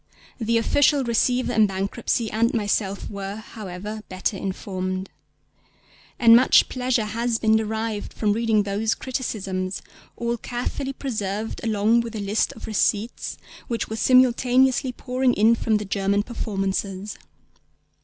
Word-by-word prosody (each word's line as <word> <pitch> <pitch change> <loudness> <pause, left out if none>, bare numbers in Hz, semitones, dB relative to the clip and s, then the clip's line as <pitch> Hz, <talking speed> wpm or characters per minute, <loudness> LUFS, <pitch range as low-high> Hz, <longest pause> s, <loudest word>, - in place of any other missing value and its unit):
The 230 0 +1
Official 285 +4 +3
Receiver 245 +1 +1
in 215 -1 +5
Bankruptcy 200 +3 -2
and 230 +2 +1
myself 205 -2 -1
were, 200 -1 -5
however, 210 -1 -7
better 185 +3 -2
informed. 185 -1 -4 1.1
And 230 -1 +7
much 255 +3 +5
pleasure 250 -3 0
has 230 +2 -1
been 220 -1 +3
derived 220 -1 -2
from 210 -2 0
reading 220 -1 +2
those 205 +2 0
criticisms, 195 -7 -3 0.3
all 235 0 -1
carefully 250 +4 -4
preserved 215 -5 -4
along 220 +1 +2
with 235 -1 -6
the 220 - -4
list 205 +2 0
of 225 - -9
receipts 215 +1 -1 0.3
which 230 -1 -3
were 220 - -3
simultaneously 255 +1 +3
pouring 250 0 0
in 220 +3 +5
from 225 -1 +1
the 210 - -5
German 200 +1 0
performances. 195 -3 -3
220 Hz, 130 wpm, -23 LUFS, 200-235 Hz, 1.1 s, And